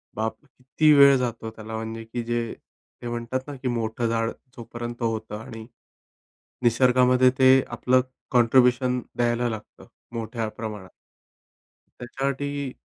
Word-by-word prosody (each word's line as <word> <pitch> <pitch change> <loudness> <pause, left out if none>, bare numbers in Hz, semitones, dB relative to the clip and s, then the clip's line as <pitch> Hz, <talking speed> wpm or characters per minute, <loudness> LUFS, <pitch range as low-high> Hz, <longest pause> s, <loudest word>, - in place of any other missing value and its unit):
बाप! 110 +1 -2
किती 135 +3 +1
वेळ 140 -1 +8
जातो 115 -3 -3
त्याला 110 0 -8
म्हणजे 110 0 -5
की 115 +1 -5
जे, 120 0 -2 0.5
ते 120 - -6
म्हणतात 120 +2 -3
ना, 145 - -6
की 130 0 -5
मोठं 115 -1 -1
झाड 115 0 0 0.3
जोपर्यंत 120 +1 -7
होतं 110 -2 -2
आणि 110 0 -9 1.0
निसर्गामध्ये 125 +1 +4
ते 130 0 +7 0.2
आपलं 125 +2 +2 0.3
कॉन्ट्रीब्यूशन 125 +1 +3 0.2
द्यायला 120 0 +1
लागतं 110 -1 -9 0.3
मोठ्या 115 0 -3
प्रमाणात. 105 -4 -7 1.1
त्यासाठी 140 +2 -3
120 Hz, 120 wpm, -25 LUFS, 115-130 Hz, 1.1 s, वेळ